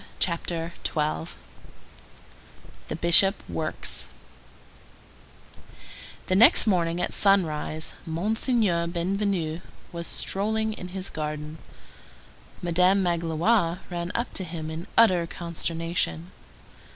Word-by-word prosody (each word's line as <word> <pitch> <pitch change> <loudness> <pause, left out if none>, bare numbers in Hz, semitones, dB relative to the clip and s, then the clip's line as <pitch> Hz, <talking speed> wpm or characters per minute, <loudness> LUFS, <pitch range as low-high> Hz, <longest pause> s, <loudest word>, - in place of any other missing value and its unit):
CHAPTER 170 -1 -2
XII—THE 150 - -7
BISHOP 170 +4 +6
WORKS 155 -1 -4 2.2
The 185 - 0
next 220 +5 +7
morning 175 -4 +1
at 180 - -2
sunrise 160 -5 +1
Monseigneur 195 0 +1
Bienvenu 175 -2 -1 0.3
was 170 -1 -3
strolling 220 +2 0
in 180 - -8
his 190 +1 -6
garden. 150 0 -5 1.0
Madame 180 +3 +3
Magloire 170 +2 +1
ran 175 0 -3
up 235 - -2
to 190 - -3
him 160 -2 -6
in 165 +4 -6
utter 185 -7 +5
consternation. 165 - -3
170 Hz, 90 wpm, -26 LUFS, 165-195 Hz, 2.2 s, next